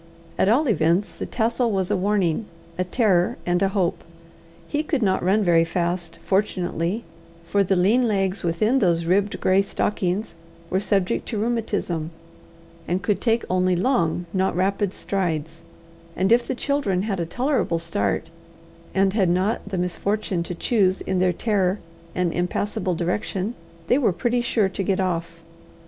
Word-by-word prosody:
At 190 - +2
all 275 +7 +3
events 180 -2 +1
the - - -3
tassel 235 +1 0
was 190 -1 -1
a - - +3
warning, 195 0 +1 0.3
a 185 - 0
terror, 185 -2 +2
and 175 +1 +1
a 195 - +4
hope. 190 -3 -1 0.6
He 295 - 0
could 295 -5 -1
not 190 -2 +2
run 195 +4 +2
very 170 -3 +4
fast, 170 0 -2
fortunately, 190 0 0 0.4
for 200 +3 +2
the 190 0 +1
lean 220 +8 +3
legs 195 -2 0
within 215 +10 +2
those 170 -5 +2
ribbed 200 +4 +1
grey 190 +1 +4
stockings 195 0 -1 0.4
were 185 - +2
subject 195 0 0
to 220 - -3
rheumatism, 205 -8 -1 0.8
and 180 +2 -1
could 205 0 0
take 230 -1 +1
only 185 0 +2
long 175 -5 +1
not 190 -2 +1
rapid 195 +1 +1
strides; 165 -5 -3 0.5
and 190 +3 +1
if 235 +1 +4
the 260 - -2
children 250 -10 0
had 200 -3 -2
a 170 - -1
tolerable 255 - 0
start, 165 -2 -1 0.6
and 195 0 +3
had 195 -5 +2
not 190 +4 0
the 190 - -3
misfortune 185 +1 -1
to 170 +1 -4
choose 190 -1 +1
in 190 -1 -1
their 185 0 +3
terror 195 0 +1 0.4
an 180 -2 +1
impassable 185 +2 -1
direction, 185 +4 -2 0.3
they 250 +10 +3
were 240 -8 +3
pretty 240 +8 0
sure 230 -4 +1
to 190 +1 -4
get 195 0 0
off. 170 -2 -2
190 Hz, 160 wpm, -23 LUFS, 175-210 Hz, 0.8 s, a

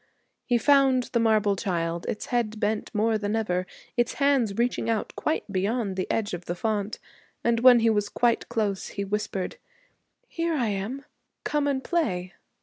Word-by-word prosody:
He 245 - +3
found 270 -1 +3
the 235 - +3
marble 215 -3 +3
child, 170 -4 -2
its 210 - -3
head 225 -3 0
bent 210 +1 -1
more 220 +1 +1
than 205 +1 -1
ever, 185 -5 -1 0.3
its 240 -1 +1
hands 275 -8 +2
reaching 235 0 0
out 225 -2 -1
quite 310 - -1
beyond 200 +1 -1
the 185 - -3
edge 210 -3 -1
of 175 0 -5
the 175 - -3
font; 210 +2 -2 0.5
and 235 -1 +2
when 245 -1 +7
he 225 - +4
was 205 -1 0
quite 240 -1 +1
close 210 -5 -1
he 200 - -4
whispered, 200 - -3 0.7
'Here 335 -1 -1
I 240 -6 +1
am. 210 +8 -4 0.4
Come 295 -1 0
and 270 -2 0
play!' 185 - -1
220 Hz, 170 wpm, -26 LUFS, 200-245 Hz, 0.7 s, when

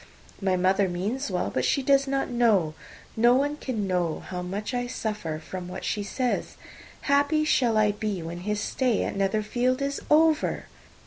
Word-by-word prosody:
My 190 -1 +1
mother 190 +1 +2
means 210 +10 -2
well; 180 -2 -1
but 130 - 0
she 275 - +1
does 275 0 +3
not 270 0 0
know, 220 -10 +2 0.4
no 240 +2 +5
one 285 +3 +1
can 245 -8 -3
know, 180 -4 -1
how 180 -1 -6
much 200 +6 -4
I 245 0 -1
suffer 210 -10 -3
from 175 +3 -7
what 180 +1 -6
she 210 - -1
says. 245 +5 -2 0.4
Happy 285 +2 +2
shall 240 -7 +2
I 210 -1 +4
be 205 -4 -3
when 170 +1 -6
his 210 +3 -2
stay 250 0 0
at - - -3
Netherfield 215 +6 0
is 280 0 -2
over!" 315 +1 +3
215 Hz, 175 wpm, -26 LUFS, 185-260 Hz, 0.4 s, no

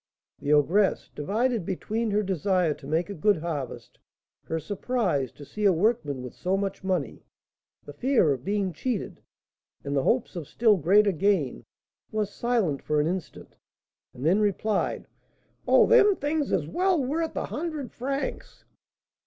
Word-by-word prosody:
The 145 - -2
ogress, 175 +7 +3
divided 220 - 0
between 215 +6 -2
her 210 +1 +1
desire 185 -3 +1
to 135 - -13
make 165 +6 0
a - - -3
good 205 +3 +2
harvest, 155 -5 -5 0.5
her 160 - -2
surprise 190 - -1
to 145 - -12
see 210 +8 -6
a 200 - +6
workman 170 - 0
with 125 - -8
so 185 +2 -1
much 195 0 -3
money, 185 -6 -2 0.6
the 145 - -9
fear 230 - +2
of 130 -2 -7
being 200 -1 -1
cheated, 230 - -3 0.6
and 140 0 -3
the 135 - +3
hopes 230 - 0
of 165 -5 -5
still 225 -3 +3
greater 200 +5 +4
gain, 170 - 0 0.5
was 210 -2 -2
silent 225 - 0
for 150 0 0
an 150 - +2
instant, 180 +1 -5 0.5
and 125 - -8
then 180 +6 +4
replied, 210 +1 0 0.6
"Oh, - - +6
them 425 -4 +6
things 295 -1 -1
is 165 -6 +1
well 360 - +1
worth 320 +5 -2
a - - -2
hundred 305 -4 -4
francs." 275 +3 -5
195 Hz, 155 wpm, -26 LUFS, 155-235 Hz, 0.6 s, a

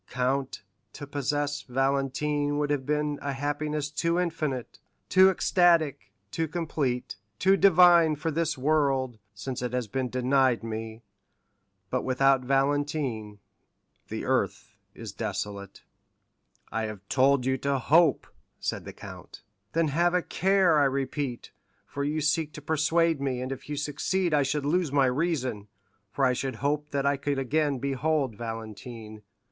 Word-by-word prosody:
Count, 130 -1 -1 0.3
to 145 - -8
possess 145 +1 -2
Valentine 140 +2 0
would 145 0 0
have 135 -3 -1
been 150 -1 0
a 140 -1 -3
happiness 145 +1 -2
too 170 +3 0
infinite, 155 -8 -3 0.3
too 190 +1 +7
ecstatic, 170 -6 +2 0.2
too 165 -1 -1
complete, 145 - -2 0.2
too 190 - +4
divine 175 -4 +6
for 160 +2 -3
this 160 -1 -1
world, 135 -4 +1 0.2
since 125 +4 -5
it 125 -1 -3
has 125 -3 -1
been 130 +4 -2
denied 130 -1 +2
me; 110 0 -6 0.9
but - - 0
without 135 +1 +3
Valentine 135 -5 -1 0.7
the - - -5
earth - - -1 0.2
is - - -7
desolate." 100 -1 -5 0.9
"I 115 0 -1
have 105 -2 -8
told 135 +1 +3
you 130 0 0
to 140 +1 0
hope," 155 +3 +3 0.3
said - - -3
the - - -8
count. - - -11 0.3
"Then 165 -2 +2
have 175 +4 +2
a 180 - +1
care, 190 -4 +3
I 145 - +4
repeat, 135 -1 -2 0.3
for 140 - -5
you 150 +2 -1
seek 150 +1 0
to 150 - -9
persuade 160 0 +1
me, 130 -3 -1
and 130 +1 -4
if 135 +2 -7
you 150 - -2
succeed 155 +5 -1
I 145 - +4
should 140 +1 -1
lose 165 0 +1
my 140 -1 +4
reason, 130 -6 -1 0.4
for 135 +4 +1
I 125 - +3
should 130 0 -3
hope 150 +4 -1
that 140 -1 -1
I 140 0 +2
could 140 0 -2
again 145 +2 0
behold 140 -1 -1
Valentine." 110 0 -7
140 Hz, 150 wpm, -27 LUFS, 130-155 Hz, 0.9 s, too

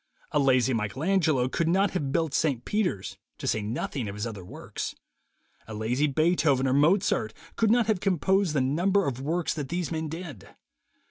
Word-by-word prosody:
A 150 - +2
lazy 130 -2 +3
Michael 110 +5 -2
Angelo 160 -9 +2
could 160 +5 -1
not 195 +4 +2
have 145 -7 -2
built 160 0 0
St. 135 -4 0
Peters, 185 - -1 0.2
to - - -7
say 110 - +1
nothing 115 +3 -3
of 100 - -6
his 105 +2 -3
other 105 -5 -6
works. 90 - -6 0.7
A 110 - -7
lazy 120 +7 0
Beethoven 145 -3 +2
or 130 - +2
Mozart 150 - +2 0.2
could 225 - +2
not 235 +1 +4
have 215 -4 +1
composed 190 -1 +1
the 140 - +3
number 180 +9 +2
of 130 -2 -3
works 165 +4 -1
that 145 -5 -5
these 175 0 -2
men 160 -1 -2
did. 160 - -8
150 Hz, 185 wpm, -27 LUFS, 125-180 Hz, 0.7 s, not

